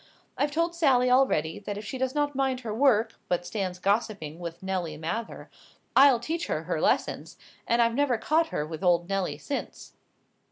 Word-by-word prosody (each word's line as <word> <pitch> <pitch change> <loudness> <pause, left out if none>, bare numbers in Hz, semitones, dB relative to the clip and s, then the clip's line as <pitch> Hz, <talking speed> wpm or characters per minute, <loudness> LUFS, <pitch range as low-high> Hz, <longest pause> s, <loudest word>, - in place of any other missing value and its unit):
I've 290 - +1
told 335 +3 0
Sally 260 -7 +3
already, 165 - +2
that 205 0 -5
if 210 - -7
she 260 +5 -5
does 260 +1 -1
not 290 -1 0
mind 265 -1 0
her 225 -4 -4
work, 225 -3 +2
but 175 0 -1
stands 185 -3 -3
gossiping 195 -5 -1
with 170 0 -7
Nelly 180 -5 -3
Mather, 170 +9 -5 0.5
I'll 270 -3 +7
teach 325 +8 -3
her - - -2
her - - -2
lessons; - - 0 0.3
and 235 0 +4
I've 230 0 +1
never 265 -2 +1
caught 320 +8 +1
her 150 - -3
with 160 +3 -7
old 175 -1 +3
Nelly 195 -1 -1
since." 285 - -6
230 Hz, 185 wpm, -27 LUFS, 180-270 Hz, 0.5 s, I'll